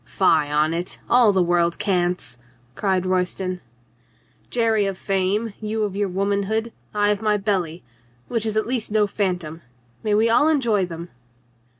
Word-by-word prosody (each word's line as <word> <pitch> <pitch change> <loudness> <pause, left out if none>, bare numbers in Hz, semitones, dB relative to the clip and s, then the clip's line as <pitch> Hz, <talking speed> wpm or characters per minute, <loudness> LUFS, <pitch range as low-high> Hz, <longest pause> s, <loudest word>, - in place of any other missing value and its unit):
"Fie - - -2 0.2
on 150 +2 +2
it! 175 +2 -3
All 240 -3 +5
the 190 -2 +2
world 170 -1 +1
cants," 180 - -1 0.3
cried 185 +4 0
Royston. 185 0 -1 0.9
"Jerry 225 -4 +2
of 195 -1 -3
fame, 195 +3 -1
you 215 0 -2
of 200 -2 -2
your 205 -1 0
womanhood, 200 +4 -1 0.2
I 205 0 +2
of 205 0 -1
my 210 -1 +2
belly 185 -5 -2 0.2
— 120 0 -35
which 225 -2 -1
is 215 0 -1
at 215 - +1
least 235 -3 -2
no 215 -1 +3
phantom. 180 -6 -3 0.4
May 210 -1 +1
we 220 +2 +3
all 240 +6 +4
enjoy 235 - +2
them 170 0 -8
200 Hz, 165 wpm, -22 LUFS, 180-215 Hz, 0.9 s, All